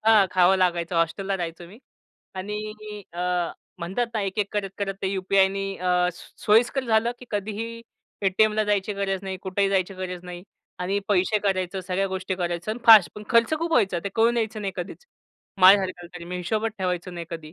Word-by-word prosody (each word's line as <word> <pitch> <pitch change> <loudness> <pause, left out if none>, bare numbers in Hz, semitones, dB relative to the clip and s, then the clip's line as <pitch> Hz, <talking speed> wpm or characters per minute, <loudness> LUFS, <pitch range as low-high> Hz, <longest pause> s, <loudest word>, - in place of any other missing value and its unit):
हां, 215 -3 +6
खावं 185 +1 +4
लागायचं 175 -2 0
हॉस्टेलला 195 +4 0
राहायचो 170 -1 -5
मी. 205 +5 -14 0.6
आणि 210 +2 -6
अ, 175 - -6 0.6
म्हणतात 190 +8 -2
ना 215 - 0
एक-एक 200 +1 -1
करत-करत 195 -1 -3
ते 190 - +1
यूपीआयनी 195 0 +1
अ, 180 0 +2
सो 175 - -15
सोयीस्कर 240 +5 +3
झालं, 225 0 +2
की 250 - -12
कधीही 220 +3 -4 0.4
एटीएमला 215 +3 +3
जायची 205 0 0
गरज 195 -1 -1
नाही. 190 -1 -4
कुठेही 195 +1 +1
जायची 195 0 0
गरज 180 -1 -6
नाही. 175 -1 -8 0.4
आणि 190 +3 -1
पैसे 205 +1 +2
काढायचं, 190 -2 -1
सगळ्या 185 +2 -1
गोष्टी 190 0 -3
करायचं 175 +2 -3
आणि 225 +3 -4
फास्ट. 220 -5 +9
पण 210 - -8
खर्च 230 +5 +4
खूप 335 +1 -2
व्हायचा. 200 - +2
ते - - -1
कळून 230 +1 +3
यायचं 220 -1 -1
नाही 195 -2 -3
कधीच. 180 - -7 0.6
माझ्यासारख्याला 185 -2 +5
तरी. 170 - -8
मी 180 +1 -5
हिशोबच 215 +5 -1
ठेवायचो 180 -1 -2
नाही 170 -1 -7
कधी. 160 -2 -7
195 Hz, 180 wpm, -25 LUFS, 180-215 Hz, 0.6 s, फास्ट